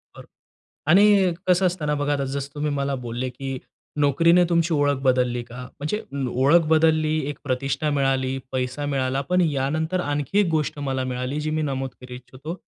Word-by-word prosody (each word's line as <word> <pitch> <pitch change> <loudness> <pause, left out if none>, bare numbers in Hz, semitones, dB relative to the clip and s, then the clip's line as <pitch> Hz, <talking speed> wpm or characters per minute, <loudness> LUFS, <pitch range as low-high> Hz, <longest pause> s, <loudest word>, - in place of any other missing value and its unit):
खरं - - -12 0.7
आणि 195 -1 +5
कसं 185 +1 +4
असतं 175 -4 -1
ना, 150 - +1
बघा 145 0 0
आता, 140 -1 -1
जसं 140 +1 -5
तुम्ही 150 0 -1
मला 140 0 -1
बोलले 120 +2 -3
की, 135 +1 -5 0.4
“नोकरीने 165 +5 +4
तुमची 170 -1 +2
ओळख 145 -1 +2
बदलली 125 -1 +1
का?” 125 +1 -10 0.2
म्हणजे 155 +9 -2 0.2
लो 125 - -2
ओळख 165 +2 +5
बदलली, 155 -1 +3
एक 145 - -5
प्रतिष्ठा 135 +3 -1
मिळाली, 135 -1 0
पैसा 130 +2 -2
मिळाला, 135 -1 -1
पण 180 0 +3
यानंतर 155 +6 -1
आणखी 145 +7 0
एक 205 - +3
गोष्ट 150 -1 -3
मला 130 -1 -1
मिळाली, 125 +4 -3
जी 155 - -2
मी - - 0
नमूद 135 0 -3
करू 125 0 -10
इच्छितो. 130 +6 -8
145 Hz, 180 wpm, -23 LUFS, 130-160 Hz, 0.7 s, आणि